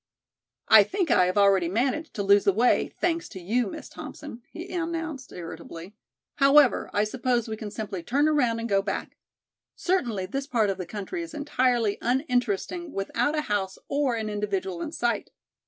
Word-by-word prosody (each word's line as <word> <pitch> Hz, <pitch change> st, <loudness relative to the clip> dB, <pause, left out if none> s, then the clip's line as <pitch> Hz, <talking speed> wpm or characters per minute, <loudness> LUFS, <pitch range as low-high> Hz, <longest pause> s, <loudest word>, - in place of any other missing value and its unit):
"I -, -, +9 dB
think 380 Hz, -4 st, -1 dB
I 180 Hz, -, +5 dB
have 185 Hz, -, -1 dB
already 195 Hz, -4 st, +4 dB
managed 260 Hz, -, -1 dB
to 205 Hz, -, -1 dB
lose 200 Hz, 0 st, +5 dB
the 200 Hz, -, +4 dB
way, 235 Hz, +5 st, +2 dB
thanks 335 Hz, -1 st, 0 dB
to 185 Hz, -, -8 dB
you, 220 Hz, +6 st, 0 dB
Miss -, -, -7 dB
Thompson," 295 Hz, -6 st, -9 dB
he 345 Hz, +2 st, -8 dB
announced 330 Hz, -5 st, -4 dB
irritably, 170 Hz, +2 st, -9 dB, 0.4 s
"However, 275 Hz, -1 st, +5 dB
I 205 Hz, -, +2 dB
suppose 240 Hz, +1 st, 0 dB
we 220 Hz, -, -3 dB
can 215 Hz, -1 st, -6 dB
simply 205 Hz, -3 st, -5 dB
turn 280 Hz, -, +1 dB
around 250 Hz, -7 st, +2 dB
and 230 Hz, -, -3 dB
go 195 Hz, -3 st, +2 dB
back. 195 Hz, 0 st, -4 dB, 0.6 s
Certainly 240 Hz, -, 0 dB
this 270 Hz, +8 st, -4 dB
part 225 Hz, -8 st, +2 dB
of 190 Hz, -, -6 dB
the 180 Hz, -, -5 dB
country 210 Hz, -, -5 dB
is 335 Hz, -1 st, -7 dB
entirely 250 Hz, -7 st, +1 dB
uninteresting 250 Hz, -, -1 dB
without 240 Hz, +9 st, -1 dB
a -, -, +2 dB
house 200 Hz, -7 st, -2 dB
or 280 Hz, -3 st, +1 dB
an 220 Hz, -1 st, -3 dB
individual 195 Hz, -4 st, -2 dB
in 300 Hz, -, -4 dB
sight. 240 Hz, -8 st, -1 dB
235 Hz, 175 wpm, -26 LUFS, 200-290 Hz, 0.6 s, I